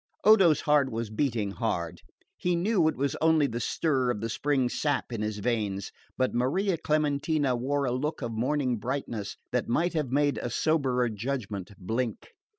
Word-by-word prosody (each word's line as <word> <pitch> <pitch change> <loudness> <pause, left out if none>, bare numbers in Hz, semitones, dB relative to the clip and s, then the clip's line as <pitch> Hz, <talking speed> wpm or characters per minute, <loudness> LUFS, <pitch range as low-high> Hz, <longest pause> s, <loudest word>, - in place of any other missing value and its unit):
Odo's 195 -7 +6
heart 150 -3 +3
was 115 -1 -3
beating 110 -4 0
hard. 100 -7 -3 0.3
He 180 0 0
knew 180 -1 +2
it 160 - 0
was 140 0 0
only 160 -2 +4
the 120 -3 -2
stir 130 +1 0
of 120 - -1
the 115 +2 -3
spring 135 0 +1
sap 145 0 -1
in 110 - -3
his 105 0 -2
veins, 105 -3 -2 0.3
but 130 0 +1
Maria 170 +11 +1
Clementina 150 -3 +1
wore 140 +3 0
a 125 - 0
look 140 +3 -2
of 120 - -3
morning 125 +2 0
brightness 120 -5 -4
that 125 -1 0
might 170 +8 +1
have 150 -5 -1
made 145 +1 +2
a 120 - -3
soberer 130 -2 +1
judgment 105 -3 -4
blink. 115 +4 -3
130 Hz, 170 wpm, -28 LUFS, 115-150 Hz, 0.3 s, Odo's